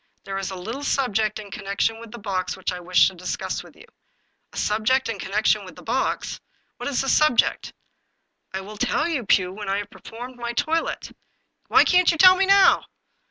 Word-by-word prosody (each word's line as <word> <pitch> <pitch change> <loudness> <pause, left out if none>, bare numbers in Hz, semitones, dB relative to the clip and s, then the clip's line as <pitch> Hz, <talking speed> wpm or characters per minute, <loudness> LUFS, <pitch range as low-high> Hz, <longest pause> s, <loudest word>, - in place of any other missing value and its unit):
There 195 0 -4
is 195 - -4
a 190 - -6
little 225 +10 -6
subject 220 -7 0
in 205 -2 -10
connection 200 +3 -2
with 230 0 -11
the 240 - -8
box 195 -4 -3
which - - -3
I 180 - -5
wish 180 +1 +4
to 190 - -4
discuss 180 0 -4
with - - -16
you." - - -16 0.4
" - - -47
A - - -12
subject 225 +5 +1
in 210 -4 -4
connection 210 +1 +1
with 185 -3 -12
the - - -13
box? 255 +4 -2 0.4
What - - -4
is 275 - 0
the 270 - -4
subject?" 305 -4 +2 0.4
" - - -51
I 190 - -4
will 210 +2 -10
tell 300 +8 0
you, 280 - -3
Pugh, 185 -2 +2
when 205 0 -6
I 195 - 0
have 205 - -5
performed 245 +2 -10
my 240 0 -4
toilet." 325 +6 -2 0.3
" - - -46
Why - - +6
can't 360 -1 +4
you 330 - -3
tell 370 +2 +8
me 385 +1 +1
now 395 -1 +5
220 Hz, 215 wpm, -23 LUFS, 195-265 Hz, 0.4 s, tell